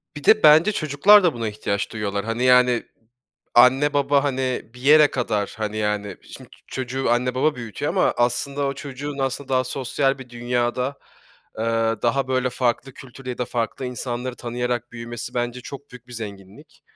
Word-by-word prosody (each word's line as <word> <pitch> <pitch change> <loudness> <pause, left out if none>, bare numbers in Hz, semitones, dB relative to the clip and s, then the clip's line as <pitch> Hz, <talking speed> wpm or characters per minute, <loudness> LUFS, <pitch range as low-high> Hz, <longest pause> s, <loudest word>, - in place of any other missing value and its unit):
Bir 150 - -8
de, 215 +5 +5
bence 155 +7 +7
çocuklar 180 +6 +5
da 175 -4 +3
buna 115 -2 -3
ihtiyaç 100 -1 -3
duyuyorlar. 100 -2 -3
Hani, 115 +2 -2
yani, 125 -1 +4 0.7
anne, 135 +4 +5
baba, 140 0 +2
hani, 130 -4 -2
bir 125 - -13
yere 150 +2 +6
kadar, 105 -5 -2
hani, 110 0 -3
yani, 105 -2 -2
şimdi - - -13 0.2
çocuğu 130 0 -3
anne, 125 +1 +1
baba 150 +4 +1
büyütüyor 115 -5 -5
ama - - +2
aslında 125 +4 0
o 140 - -2
çocuğun 140 +1 -7
aslında 135 0 -2
daha 130 -1 +1
sosyal 135 +1 -1
bir 130 -2 -11
dünyada, 120 +2 -2 0.6
ııı, 115 0 0
daha 130 +3 +1
böyle 130 -1 0
farklı 125 +1 -1
kültür 130 0 -13
ya 125 -1 -4
da 125 - 0
farklı 120 +2 -3
insanları 125 0 -4
tanıyarak 120 0 -3
büyümesi 120 0 -7
bence 120 0 -2
çok 140 +2 -10
büyük 125 -1 -13
bir - - -12
zenginlik. 105 - -10
125 Hz, 170 wpm, -22 LUFS, 120-135 Hz, 0.7 s, bence